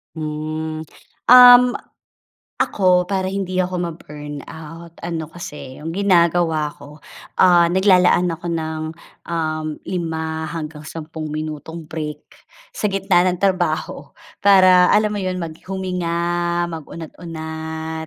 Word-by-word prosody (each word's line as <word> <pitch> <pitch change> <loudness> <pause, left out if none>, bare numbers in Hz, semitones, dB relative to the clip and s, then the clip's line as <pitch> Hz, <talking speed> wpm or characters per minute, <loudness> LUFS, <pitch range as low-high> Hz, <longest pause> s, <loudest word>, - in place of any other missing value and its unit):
Hmm, 155 0 -4 0.5
um, 250 0 +10 1.0
ako 180 -1 +2
para 190 -1 0
hindi 190 -1 -3
ako 185 0 0 0.2
ma-burnout, 155 +2 -10
ano 165 -2 -4
kasi 150 -5 -9
'yong 165 - -4
ginagawa 170 -4 +2
ko, 150 +2 -14 0.4
ah, 175 -2 +6
naglalaan 180 -1 +4
ako 165 +1 -6
ng, 160 -1 -3 0.4
um, 155 -2 -2 0.2
5 160 -3 -3
hanggang 155 -1 -7
10 160 -1 -7
minutong 155 +1 -6
break 150 -2 -5 0.5
sa 210 - -2
gitna 195 -2 +2
ng 180 +1 -1
trabaho, 180 -5 -1 0.2
para 185 -2 +6
alam 210 0 +3
mo 210 - -3
iyon, 185 -2 -3
mag 160 -1 -7
huminga, 180 -3 -2 0.5
mag-unat-unat 160 0 -7
165 Hz, 110 wpm, -20 LUFS, 155-185 Hz, 1.0 s, um